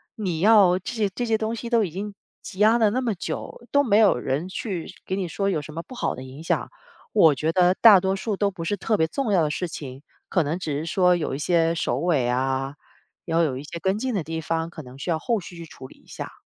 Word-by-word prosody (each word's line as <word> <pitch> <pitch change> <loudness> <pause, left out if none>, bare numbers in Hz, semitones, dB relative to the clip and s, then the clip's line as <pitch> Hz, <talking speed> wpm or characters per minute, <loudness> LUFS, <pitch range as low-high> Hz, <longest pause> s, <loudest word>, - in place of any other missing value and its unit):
你 185 -8 -3
要 195 -3 +5
这 215 - -6
些 215 -3 0
这 245 - -2
些 225 -1 +1
东 220 0 -2
西 235 +1 -5
都 230 -2 +3
已 175 - -3
经 200 +3 -6 0.3
积 190 - -10
压 220 +3 +5
了 215 -3 +3
那 255 +3 0
么 235 -4 0
久， 235 +5 -6
都 285 0 +5
没 210 -5 +3
有 210 - +5
人 135 +7 -2
去 185 -2 -4 0.2
给 190 - -2
你 185 -3 -2
说 195 +4 -1
有 160 -6 0
什 155 +1 -10
么 165 +1 -5
不 255 - -12
好 240 - -1
的 130 - -8
影 135 +4 -10
响， - - -1 0.4
我 160 -9 +6
觉 155 +5 0
得 180 +1 +4
大 210 -5 +9
多 190 +1 0
数 205 +1 -2
都 200 -1 +1
不 170 -3 -7
是 205 - 0
特 215 +3 0
别 160 -2 +2
重 245 +2 -2
要 180 -4 +4
的 150 - 0
事 180 +3 -2
情， 135 -4 -8 0.3
可 180 -4 +2
能 160 +5 -2
只 150 -5 -3
是 155 - -4
说 180 +1 +3
有 155 -5 -2
一 - - -2
些 165 0 +2
手尾 145 -3 0
啊， 135 +2 -1 0.5
要 165 0 +1
有 130 -5 -1
一 140 - -7
些 170 +3 -7
跟 190 +3 0
进 255 +2 -2
的 185 -6 -1
地 160 +1 -4
方， 165 +1 -2
可 170 -2 -9
能 125 +1 -12
需 175 - -5
要 160 - +2
后 230 +6 -1
续 175 0 -11
去 170 -1 -8
处 130 -4 -11
理 - - -17
一 - - -26
下。 - - -9
180 Hz, 290 characters per minute, -24 LUFS, 155-210 Hz, 0.5 s, 大